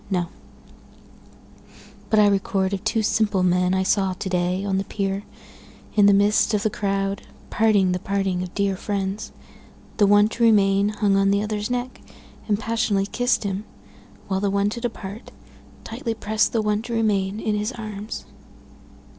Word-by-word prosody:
—No; 180 -3 -1 1.8
But 215 - +4
I 210 - +6
record 195 -1 0
of 200 - -3
two 220 0 0
simple 205 -3 +1
men 180 +1 +2
I 190 - +1
saw 195 -1 +1
to 190 +1 -5
day, 180 +1 0
on 190 -1 0
the - - -1
pier, 195 -1 -2 0.7
in 205 -1 +6
the 200 - +6
midst 205 +2 +3
of 205 - -1
the 215 - +1
crowd, 195 -1 -1 0.3
parting 205 -4 +3
the 180 - -1
parting 195 -1 -1
of 180 -1 -5
dear 200 -1 +1
friends; 200 +2 -3 0.7
The 205 - +4
one 205 +1 +5
to 235 - -7
remain 200 -2 +4
hung 210 -2 +1
on 195 0 +3
the 200 +1 +2
other's 210 0 -3
neck, 250 +1 -3 0.5
and 210 -2 +2
passionately 220 -3 0
kiss'd 245 +3 0
him, 200 0 -3 0.6
While 190 -1 0
the 200 0 0
one 200 +1 +1
to 235 - -5
depart, 220 -2 -6 0.5
tightly 230 0 -4
prest 215 0 0
the 225 -2 0
one 210 0 0
to 235 +1 -6
remain 210 -3 0
in 215 - -1
his 210 +3 -1
arms. 215 -3 -7
205 Hz, 170 wpm, -23 LUFS, 195-215 Hz, 1.8 s, I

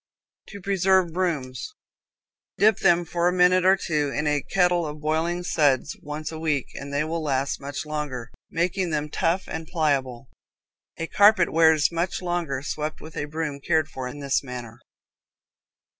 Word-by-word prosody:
To 200 - -9
Preserve 190 -2 +2
Brooms. 165 - -2 0.8
Dip 215 0 +4
them 175 -2 +3
for 170 +1 0
a - - +3
minute 180 0 +4
or 190 +1 +6
two 150 -6 -1
in 150 +2 -2
a 150 -1 +1
kettle 180 0 +2
of 150 0 -7
boiling 160 +3 -1
suds 145 -3 +1
once 150 +1 -5
a 160 - -7
week 150 -5 0
and 140 +1 -7
they 140 +1 0
will 165 +1 -3
last 140 -2 -1
much 140 +2 -5
longer, 145 -6 -4 0.2
making 180 +2 0
them 150 -1 -2
tough 170 +5 0
and 160 0 -5
pliable. 135 -7 -1 0.7
A 165 - -2
carpet 200 0 +4
wears 160 -1 +5
much 170 +2 -1
longer 175 -7 -2
swept 150 +2 -4
with 160 - -11
a - - -2
broom 150 -1 -4
cared 155 +2 +1
for 130 -3 -5
in 145 +3 -8
this 140 -1 +1
manner. 120 -3 -8
155 Hz, 165 wpm, -25 LUFS, 145-175 Hz, 0.8 s, or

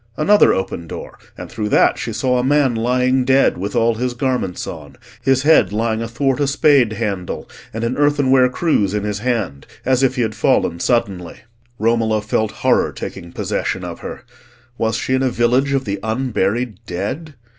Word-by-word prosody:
Another 205 +7 +5
open 85 -3 -3
door; - - -8 0.2
and - - -7
through 105 -1 -4
that - - +3
she - - -4
saw 125 -1 0
a - - 0
man 140 -1 +3
lying 125 +3 +1
dead 135 +2 +3
with 100 +4 -4
all 115 0 +3
his 125 +2 -3
garments 125 -8 -2
on, 75 -4 -9 0.3
his 135 0 +2
head 145 - +4
lying 110 +1 -1
athwart 130 +4 -1
a 145 - +1
spade 140 -5 +3
handle, 100 -5 -4 0.2
and 115 +1 -5
an 115 +2 -1
earthenware 140 -3 +3
cruse 115 - 0
in 105 - -1
his 105 -1 -3
hand, 110 - -2 0.2
as 130 0 +2
if 135 -1 +2
he 125 - +1
had 110 -1 -2
fallen 85 -4 +1
suddenly. 95 -8 -1 0.4
Romola 110 0 +1
felt 110 0 0 0.2
horror 130 - +3
taking 85 - -8
possession - - -3
of - - -6
her. - - -8 0.5
Was 110 -2 -1
she 130 - -2
in 130 - +2
a 130 - +2
village 125 +3 +1
of 135 -1 0
the 100 -1 -3
unburied 110 -2 -1
dead? 135 - -4
120 Hz, 180 wpm, -19 LUFS, 105-130 Hz, 0.5 s, Another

